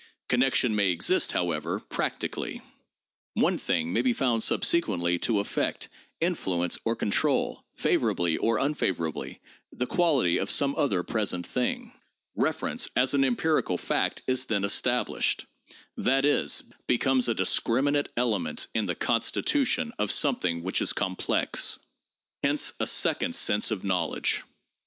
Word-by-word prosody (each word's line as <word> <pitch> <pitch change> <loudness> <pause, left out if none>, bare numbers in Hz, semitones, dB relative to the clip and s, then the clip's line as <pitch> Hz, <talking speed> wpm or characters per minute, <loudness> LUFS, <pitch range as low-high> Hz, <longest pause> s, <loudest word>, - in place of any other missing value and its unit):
Connection 125 -2 +2
may 100 -2 +2
exist, 85 - +2
however, 85 -4 -1
practically: - - -4 0.7
one - - +2
thing 85 0 -1
may 115 - +2
be 125 -1 +2
found 120 -3 0
subsequently 90 - +1
to 110 +1 +1
affect, 100 - -2 0.3
influence 95 - -1
or 115 0 +1
control, 105 - 0
favorably 85 -2 +1
or 115 -1 +1
unfavorably, 95 - -2 0.3
the 125 - -3
quality 145 - +2
of 95 - -2
some 140 -1 +2
other 95 -11 0
pres 110 -2 -1
ent 90 -1 -6
thing. 240 - -2 0.4
Reference - - -1
as - - +3
an 275 - +3
empirical 160 - +1
fact - - -1
is 130 0 +1
then 100 -5 -1
established— 120 +5 +1 0.5
that 135 +2 +1
is, 145 - +2 0.2
becomes 130 0 +2
a 115 - +1
discriminate 145 +5 +1
element 115 -6 0
in 110 -2 0
the 90 - -1
constitution 250 - 0
of - - 0
something 90 - +1
which 95 +2 0
is - - +2
complex. 95 -2 0 0.6
Hence - - +1
a - - 0
second - - +1
sense 105 - +3
of 110 -4 -3
knowledge. 95 -2 0
115 Hz, 135 wpm, -27 LUFS, 90-140 Hz, 0.7 s, as